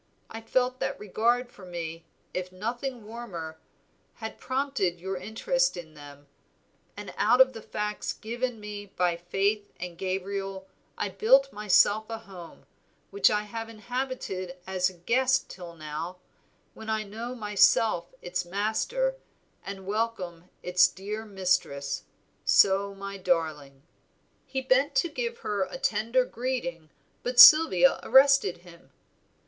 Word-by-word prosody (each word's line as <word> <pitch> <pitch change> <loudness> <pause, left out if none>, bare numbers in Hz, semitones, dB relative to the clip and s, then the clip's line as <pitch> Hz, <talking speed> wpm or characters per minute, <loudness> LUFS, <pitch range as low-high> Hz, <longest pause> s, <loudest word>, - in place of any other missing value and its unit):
I 225 - -7
felt 250 +3 0
that - - -2
regard 235 +5 0
for 200 - -15
me, 165 -2 -6 0.3
if 185 0 -4
nothing 235 +4 -4
warmer, 185 -9 -7 0.6
had 220 -1 -7
prompted 255 -10 -1
your 190 +2 -4
interest 480 - 0
in 160 -3 -9
them; 145 -1 -13 0.7
and - - -8
out 250 - +4
of 260 0 +6
the 225 - -8
facts 210 0 -3
given 240 +1 -4
me 205 -1 -7
by 180 -2 0
Faith 200 +4 -1
and 175 -1 -7
Gabriel 195 0 -3 0.3
I 205 - -1
built 265 +8 +4
myself 210 +1 +3
a 225 - -4
home, 190 -6 -12 0.5
which 405 - +4
I 210 0 0
have 225 +2 -6
inhabited 230 -6 -5
as 185 -1 0
a - - -13
guest 260 +9 +1
till 175 -2 -10
now, 155 +3 -6 0.6
when 220 0 -9
I 220 0 0
know 225 +4 -6
myself 210 -4 +2
its 175 0 -2
master, 220 - -1 0.5
and 195 -1 -7
welcome 195 -5 -3 0.2
its 180 0 +5
dear 210 +4 -6
mistress, 180 -8 -1 0.4
so 200 +1 +4
my 200 0 -7
darling." 155 -7 -2 0.6
He 265 - -2
bent 260 +2 +2
to 300 +6 +2
give 470 +4 -3
her 200 -3 0
tender 230 +2 +1
greeting, 235 -12 -4 0.3
but 245 0 -1
Sylvia 325 - +9
arrested 270 -10 +4
him. 170 -1 -16
205 Hz, 130 wpm, -27 LUFS, 180-240 Hz, 0.7 s, Sylvia